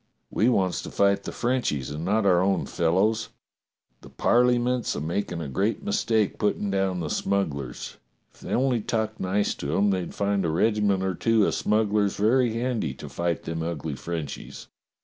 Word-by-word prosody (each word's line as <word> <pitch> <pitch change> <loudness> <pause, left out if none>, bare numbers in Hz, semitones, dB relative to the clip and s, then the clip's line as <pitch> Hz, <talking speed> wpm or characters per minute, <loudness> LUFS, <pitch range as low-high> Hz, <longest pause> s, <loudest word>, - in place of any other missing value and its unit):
We 115 - +3
wants 95 -6 +1
to - - -7
fight 100 0 +2
the - - -4
Frenchies 120 - -1
and 75 +2 -5
not 105 +4 +1
our 90 -2 +4
own 95 +1 +1
fellows. 105 +7 +1 0.7
The - - -13
Parleyment's 125 0 +2
a - - -2
makin' 85 +3 -2
a 80 - -4
great 100 - -1
mistake 115 - 0
puttin' 105 -1 0
down 95 -2 0
the 80 - -3
smugglers. 75 -11 -2 0.4
If - - -22
they - - -8
only 125 -2 +2
talked 110 0 -2
nice 100 +2 0
to 70 +2 -3
'em 100 0 +3
they'd 90 -3 -3
find 100 -1 0
a 85 - 0
regiment 100 +2 +2
or 95 0 0
two 110 +3 +2
o' - - +1
smugglers 105 -1 +1
very 115 +3 +3
handy 115 - -2
to - - -9
fight 85 -1 -2
them 80 0 -4
ugly 80 -2 -3
Frenchies. 80 0 -6
100 Hz, 175 wpm, -26 LUFS, 85-110 Hz, 0.7 s, our